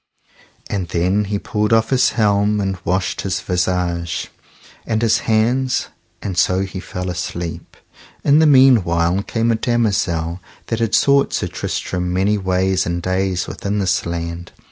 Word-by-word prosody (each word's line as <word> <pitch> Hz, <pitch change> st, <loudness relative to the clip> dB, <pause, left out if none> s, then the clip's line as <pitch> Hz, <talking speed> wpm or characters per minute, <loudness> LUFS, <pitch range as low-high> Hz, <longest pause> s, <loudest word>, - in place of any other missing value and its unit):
And 95 Hz, -3 st, -3 dB
then 90 Hz, +5 st, +1 dB
he 100 Hz, +1 st, -2 dB
pulled 105 Hz, +1 st, -2 dB
off 115 Hz, +1 st, +3 dB
his 130 Hz, -1 st, +3 dB
helm 105 Hz, -1 st, +2 dB
and 95 Hz, -1 st, -1 dB
washed 95 Hz, +2 st, -1 dB
his 95 Hz, -2 st, -2 dB
visage 90 Hz, -2 st, -1 dB, 0.5 s
and 110 Hz, -1 st, -1 dB
his 115 Hz, -1 st, +2 dB
hands, 120 Hz, +4 st, +1 dB, 0.3 s
and 95 Hz, -, -3 dB
so 95 Hz, +1 st, +2 dB
he 95 Hz, -1 st, -4 dB
fell 90 Hz, 0 st, -6 dB
asleep. 85 Hz, -2 st, -5 dB, 0.5 s
In 145 Hz, +1 st, +5 dB
the 160 Hz, -, +5 dB
meanwhile 100 Hz, -, +4 dB
came 115 Hz, +2 st, 0 dB
a -, -, +2 dB
damosel 95 Hz, -8 st, 0 dB, 0.3 s
that 115 Hz, -, -1 dB
had 115 Hz, -1 st, +1 dB
sought 140 Hz, 0 st, +3 dB
Sir -, -, 0 dB
Tristram 90 Hz, 0 st, -3 dB
many 95 Hz, +3 st, +1 dB
ways 95 Hz, -1 st, 0 dB
and 85 Hz, 0 st, -1 dB
days 95 Hz, 0 st, -1 dB
within 100 Hz, +1 st, -4 dB
this 95 Hz, -2 st, +1 dB
land. 85 Hz, 0 st, -5 dB
95 Hz, 150 wpm, -19 LUFS, 90-110 Hz, 0.5 s, In